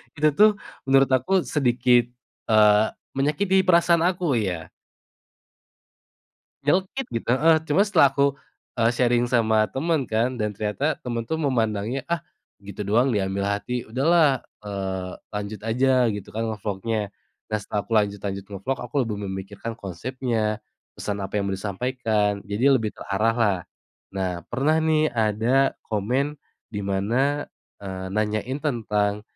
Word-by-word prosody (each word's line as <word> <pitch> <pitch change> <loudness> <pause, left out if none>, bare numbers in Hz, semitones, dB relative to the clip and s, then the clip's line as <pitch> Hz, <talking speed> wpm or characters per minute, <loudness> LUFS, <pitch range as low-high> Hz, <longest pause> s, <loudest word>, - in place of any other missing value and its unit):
Itu 155 0 +3
tuh 210 +9 +6 0.4
menurut 135 0 +4
aku 165 +9 +2
sedikit, 125 -3 +2 0.4
eee, 105 -1 +5 0.3
menyakiti 185 +7 +2
perasaan 170 -1 +5
aku 170 -7 +1
ya. 90 -6 -3 1.9
Nyelekit 185 - 0
gitu, 115 - -4
heeh, 155 +6 +5
cuma 150 +7 +3
setelah 180 -9 +5
aku, 140 0 +3 0.5
eee, 115 0 +4
sharing 120 -1 +2
sama 110 -3 +3
temen 140 - -1
kan 120 +3 0
dan 105 -1 -2
ternyata 110 +9 -1
temen 120 -2 -3
tuh 160 - -1
memandangnya, 120 -4 -1
"Ah 170 -1 -1 0.4
gitu 100 0 -6
doang 120 +6 +3
diambil 100 -2 -1
hati, 105 +5 -2
udah 125 +4 -3
lah, 170 -3 +6 0.3
eee, 95 -2 -4 0.2
lanjut 105 0 -4
aja 125 +2 +3
gitu 100 -2 -7
kan 115 +1 -2
ngevlognya." 105 0 -3 0.4
Nah 110 - +2
setelah 105 +1 -3
aku - - -21
lanjut-lanjut 100 -1 -3
ngevlog, 105 +7 -3
aku 120 +2 -9
lebih 110 -3 -4
memikirkan 95 +4 -6
konsepnya, 110 +2 -2 0.4
pesan 100 -1 -4
apa 95 +1 -5
yang 100 -1 0
mau - - -1
disampaikan, 105 0 -1
jadi 115 +7 +3
lebih 110 -6 +1
terarah 110 +3 0
lah. 105 -6 +2 0.6
Nah 95 -1 -1 0.2
pernah 145 +6 +1
nih 155 -1 +2
ada 115 +4 +2
komen 130 +8 -1 0.3
di 105 - -4
mana, 115 +10 0 0.4
eee, 95 -1 -5
nanyain 110 +5 -1
tentang 105 -7 0
115 Hz, 135 wpm, -24 LUFS, 105-135 Hz, 1.9 s, tuh